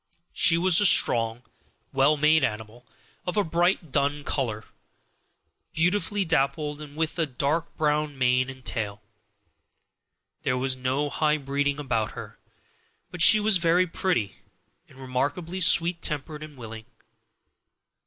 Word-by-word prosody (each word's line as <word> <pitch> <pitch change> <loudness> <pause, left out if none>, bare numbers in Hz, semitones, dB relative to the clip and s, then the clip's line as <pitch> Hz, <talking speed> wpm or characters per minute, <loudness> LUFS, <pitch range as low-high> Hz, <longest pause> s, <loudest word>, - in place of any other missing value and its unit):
She 165 -1 +4
was 180 +1 +4
a - - +4
strong, 115 -7 +3 0.5
well 140 +3 +3
made 155 +1 +3
animal, 110 +2 -5 0.4
of 180 - -3
a 205 - +3
bright 170 -1 0
dun 145 +1 0
color, 115 -8 -3 1.1
beautifully 200 +4 0
dappled, 150 -1 -1
and 145 -1 -11
with 160 +2 -3
a 160 - +1
dark 145 +5 -3
brown 150 -1 -1
mane 125 0 +1
and 130 -1 -12
tail. 105 -2 -4 1.4
There 125 - -1
was 130 0 -1
no 130 +3 -2
high 155 -1 +1
breeding 140 0 -2
about 115 -7 -2
her, - - -10 0.7
but 180 -2 -5
she 215 +6 +7
was 210 -2 +3
very 170 +1 +2
pretty 165 - -2 0.5
and - - -19
remarkably 145 +8 -3
sweet 170 0 +4
tempered 150 0 -3
and 155 -2 -11
willing. 110 -2 -9
145 Hz, 135 wpm, -25 LUFS, 130-165 Hz, 1.4 s, she